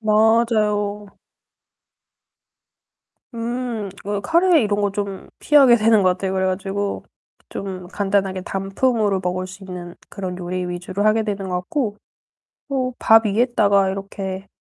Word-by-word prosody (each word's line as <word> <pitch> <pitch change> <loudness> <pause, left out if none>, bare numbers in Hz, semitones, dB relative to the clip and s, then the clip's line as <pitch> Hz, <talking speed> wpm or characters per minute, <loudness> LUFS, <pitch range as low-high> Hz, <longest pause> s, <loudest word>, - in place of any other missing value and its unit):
맞아요. 215 -2 +1 2.2
음. 235 -3 -3 0.2
어 205 0 -1
카레 340 - +4
이런 205 0 0
거 205 - +1
좀 200 -1 -5
피하게 275 -5 +6
되는 220 -2 +4
것 185 - +5
같아요 190 +1 -2
그래 190 0 0
가지고. 195 +2 -2 0.5
좀 185 -2 -6
간단하게 195 -1 -1
단품으로 195 +2 0
먹을 180 +1 -2
수 190 +1 -11
있는 180 -2 -8 0.2
그런 185 -2 -5
요리 180 0 -3
위주로 180 +3 -3
하게 215 +1 +4
되는 200 -3 -3
것 180 - -1
같고 210 -1 -2 0.7
또 255 -2 -1
밥 225 0 +5
위에다가 205 -3 +2
이렇게 195 0 -5
200 Hz, 255 characters per minute, -21 LUFS, 190-220 Hz, 2.2 s, 피하게